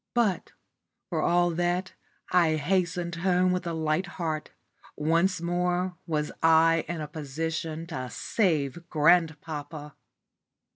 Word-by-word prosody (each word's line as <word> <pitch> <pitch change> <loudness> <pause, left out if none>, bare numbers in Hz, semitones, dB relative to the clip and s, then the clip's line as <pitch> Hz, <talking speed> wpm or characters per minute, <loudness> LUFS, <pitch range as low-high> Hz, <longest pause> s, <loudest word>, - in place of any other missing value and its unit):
But, 220 -6 +1 0.6
for - - 0
all 175 0 +3
that, 175 +2 -1 0.4
I 170 -3 +4
hastened 175 +1 0
home 180 +1 +2
with 180 -1 -1
a 170 - -2
light 160 +3 0
heart. 160 -3 -2 0.5
Once 165 +5 +2
more 180 +1 0
was 150 -2 -1
I 165 0 +5
in 170 -2 -4
a 150 - -4
position 160 +2 -4
to 130 -7 -5
save 170 - -1
grandpapa. 155 -2 +1
165 Hz, 115 wpm, -27 LUFS, 155-180 Hz, 0.6 s, I